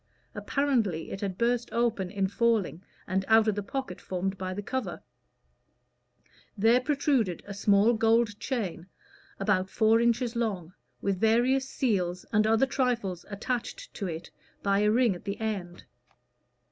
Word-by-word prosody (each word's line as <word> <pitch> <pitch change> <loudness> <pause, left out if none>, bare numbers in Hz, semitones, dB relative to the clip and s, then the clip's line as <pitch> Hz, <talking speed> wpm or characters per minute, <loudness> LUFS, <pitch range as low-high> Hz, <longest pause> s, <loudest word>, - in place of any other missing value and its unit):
Apparently 230 - 0
it 195 - -6
had 195 -3 -3
burst 240 +1 +1
open 230 -6 0
in 195 -1 -1
falling, 210 -4 +1 0.2
and 190 +1 0
out 220 0 +5
of 215 - +3
the 205 - -3
pocket 200 -2 -5
formed 190 +1 -3
by 185 -1 -4
the 205 +2 -5
cover, 260 +4 -4 1.5
there 225 +5 +4
protruded 265 - 0
a 200 - -7
small 200 +3 +4
gold 225 -1 +2
chain 195 -9 -3 0.5
about 195 -1 +1
four 225 +2 +3
inches 235 0 +1
long, 195 -7 -2 0.3
with 195 -2 -1
various 245 +5 +2
seals 185 -8 -1
and 215 0 +4
other 225 +4 +4
trifles 240 -10 -1
attached 245 - -4
to 200 - -4
it 165 -1 -6 0.3
by 200 0 +2
a 210 0 +3
ring 235 -1 +3
at 175 - -10
the 200 0 -4
end. 195 -6 -4
215 Hz, 145 wpm, -28 LUFS, 190-235 Hz, 1.5 s, out